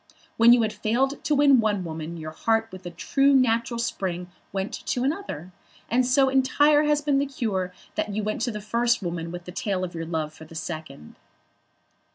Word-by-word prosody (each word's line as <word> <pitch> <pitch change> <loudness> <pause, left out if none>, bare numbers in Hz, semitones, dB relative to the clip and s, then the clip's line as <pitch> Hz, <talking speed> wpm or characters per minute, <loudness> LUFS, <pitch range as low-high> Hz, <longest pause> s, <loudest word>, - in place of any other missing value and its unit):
When 230 +1 +7
you 240 -1 +6
had 215 - -1
failed 265 +7 0
to 305 -2 +2
win 280 -2 +6
one 210 -4 +1
woman 160 0 -6
your 155 -1 -6
heart 225 +6 0
with 185 -1 -9
a - - -3
true 275 +11 +2
natural 235 -2 +2
spring 180 -6 -3 0.2
went 195 +1 -3
to 245 - 0
another. 270 - -3 0.4
And 250 +1 +3
so 270 +1 +4
entire 290 +3 +4
had 295 0 +1
been 280 -2 +3
the 280 - 0
cure, 205 -9 -2 0.2
that - - -2
you 210 +1 -2
went 215 +1 -2
to 245 0 0
the 210 -1 -6
first 235 +2 +1
woman 170 -1 -4
with 175 0 -7
the 180 - -7
tale 190 0 -2
of 180 -1 -4
your 165 -1 -5
love 160 -2 -3
for 160 - -12
the 165 - -14
second." 155 - -7
215 Hz, 200 wpm, -25 LUFS, 175-260 Hz, 0.4 s, When